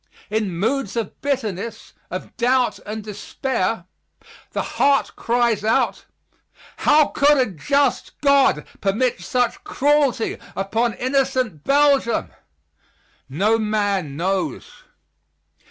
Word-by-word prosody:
In 210 -5 -1
moods 230 +3 -1
of 230 -4 -4
bitterness, 230 -6 -3 0.2
of - - -7
doubt 250 +1 +1
and 215 +1 -5
despair 210 -1 -3 0.7
the - - -2
heart 280 -1 +1
cries 235 -2 +1
out, 220 - +1 0.7
"How 300 0 +4
could 290 +1 +4
a 260 - +4
just 275 - 0
God 280 - +4 0.2
permit 205 +2 0
such 245 +7 -1
cruelty 280 -4 +1 0.2
upon 220 +4 0
innocent 255 - 0
Belgium?" 280 -4 +3 1.0
No 205 +11 +2
man 205 -8 -1
knows. 180 -4 -2
230 Hz, 100 wpm, -21 LUFS, 200-270 Hz, 1.0 s, How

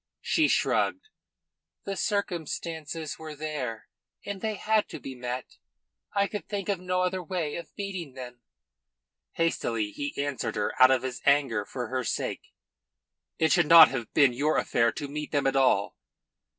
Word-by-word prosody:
She 315 -2 +2
shrugged. 435 - +1 0.7
"The 195 - -4
circumstances 165 -5 -3
were 155 -1 -8
there, 145 -7 -4 0.4
and 200 -2 -5
they 220 -1 -1
had 215 +1 +1
to - - -7
be 135 - -7
met. 125 0 -6 0.6
I 200 0 +3
could 205 +1 -6
think 205 -1 -3
of 200 -3 0
no 180 0 0
other 185 0 -1
way 170 -4 -3
of 170 - -7
meeting 190 -8 -5
them." 125 -2 -9 0.9
Hastily 115 -10 -1
he 145 +7 -5
answered 140 -4 -2
her 105 -1 -1
out 130 - +10
of 130 -1 +2
his 130 -1 -4
anger 140 -7 +2
for 125 -3 -5
her 130 0 -1
sake: 110 - -3 0.9
"It 160 0 +2
should 175 -4 +4
not 165 0 +10
have 120 -5 -5
been 140 -5 +5
your 145 +5 +1
affair 115 0 +2
to 145 - -5
meet 150 +1 -5
them 145 -2 +1
at 135 0 +2
all." 130 -7 +3
150 Hz, 165 wpm, -27 LUFS, 130-180 Hz, 0.9 s, out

